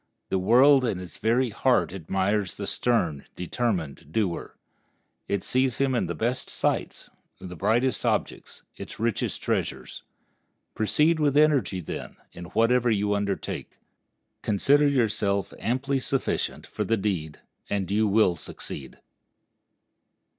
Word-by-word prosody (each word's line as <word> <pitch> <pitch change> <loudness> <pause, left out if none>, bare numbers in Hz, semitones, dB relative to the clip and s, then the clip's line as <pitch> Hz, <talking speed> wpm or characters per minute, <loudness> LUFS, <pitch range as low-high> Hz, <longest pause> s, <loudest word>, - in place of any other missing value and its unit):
The 95 - +1
world 130 +8 +6
in 110 -7 -1
its 90 -1 -10
very 120 +2 +2
heart 120 -4 +2
admires 95 +2 -1
the 100 - -5
stern, 90 - 0
determined 90 - -3
doer. 95 -3 -2 0.7
It 100 -2 -1
sees 130 -1 +1
in 135 -1 +2
him 120 - 0
its - - -3
best 120 +3 -1
sights, - - -2 0.3
its 90 -1 -8
brightest 110 +6 +1
objects, - - -2
its - - -9
richest 115 -1 -1
treasures. - - -2 0.7
Proceed 150 +9 +2
with 145 -2 +2
energy, 145 -11 +3
then, 80 - -7 0.2
in 90 - -8
whatever 115 +5 +2
you 105 -2 +1
undertake. 100 -1 -3 0.6
Consider 140 +8 +3
yourself 105 -7 0
amply 135 +3 0
sufficient 135 +1 -2
for - - -4
the 115 - +1
deed, 90 -7 -2 0.3
and 100 -2 -1
you 105 +1 +3
will 100 -3 +3
succeed. 70 -3 -7
110 Hz, 125 wpm, -26 LUFS, 95-125 Hz, 0.7 s, world